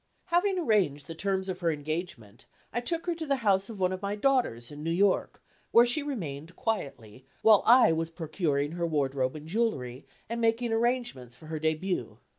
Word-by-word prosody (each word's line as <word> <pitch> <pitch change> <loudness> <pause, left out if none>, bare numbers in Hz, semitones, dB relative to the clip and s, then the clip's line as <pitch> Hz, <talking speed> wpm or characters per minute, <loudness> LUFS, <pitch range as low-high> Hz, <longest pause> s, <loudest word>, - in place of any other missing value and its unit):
Having 370 +2 +1
arranged 195 - +1
the 165 - -7
terms 190 +2 -2
of 185 -1 -4
her 170 -2 +1
engagement, 150 - -5 0.3
I 240 - -1
took 335 +7 -1
her 350 - 0
to 325 -1 -5
the 280 - +2
house 195 0 +3
of 215 -3 -8
one 185 0 +1
of 185 - -5
my 200 0 -2
daughters 210 - 0
in 145 0 -9
New 165 - -2
York, 190 +3 +1 0.3
where 235 +1 +6
she 245 +6 +3
remained 170 - -5
quietly, 135 - -4 0.2
while 215 -2 +7
I 240 -7 +7
was 160 0 -1
procuring 155 -3 -1
her 170 0 -2
wardrobe 135 -3 0
and 155 0 -9
jewelry, 155 - -2 0.2
and 230 +1 -3
making 230 +1 +1
arrangements 230 - -1
for 155 - -15
her 155 0 -4
début. 160 +4 -2
180 Hz, 190 wpm, -28 LUFS, 150-230 Hz, 0.3 s, while